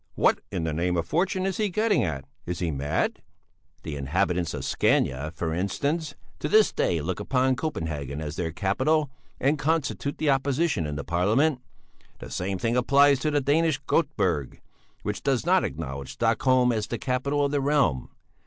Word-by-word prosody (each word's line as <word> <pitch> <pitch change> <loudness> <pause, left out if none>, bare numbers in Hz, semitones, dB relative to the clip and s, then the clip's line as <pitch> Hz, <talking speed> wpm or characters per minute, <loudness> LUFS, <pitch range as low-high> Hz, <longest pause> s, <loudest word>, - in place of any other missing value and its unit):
"What - - +3
in 85 - -2
the 80 -1 -1
name 90 +3 0
of 85 - 0
fortune 185 +3 0
is 195 -1 -1
he 215 -2 +1
getting 210 - +2
at? 70 -7 -3 0.2
Is 90 0 -2
he 85 -2 -1
mad?" 75 +3 -1 0.6
"The 75 - -5
inhabitants 80 +4 0
of 65 -2 -5
Scania, 70 +4 +1
for 80 -1 -2
instance, 140 - -1 0.2
to 150 - -2
this 215 +4 +5
day 85 -3 0
look 90 +5 -3
upon 130 +4 +1
Copenhagen 80 - -4
as 75 -1 -5
their 85 -2 -2
capital, 130 - +1 0.3
and 145 +3 +1
constitute 145 -1 -1
the 155 -2 +2
opposition 135 - +1
in 75 - -4
Parliament. 115 - +1 0.6
The - - -10
same 95 +1 -2
thing 115 +5 0
applies 140 +2 +4
to 155 - 0
the 145 -1 +1
Danish 150 +1 +2
Göteborg, 95 - 0 0.4
which - - -3
does - - 0
not - - +4
acknowledge 70 -2 -5
Stockholm 130 -1 +3
as 110 -3 -1
the 120 - -3
capital 140 +3 0
of 140 - -1
the 145 -1 +1
realm. 135 - +1
120 Hz, 170 wpm, -26 LUFS, -, 0.6 s, this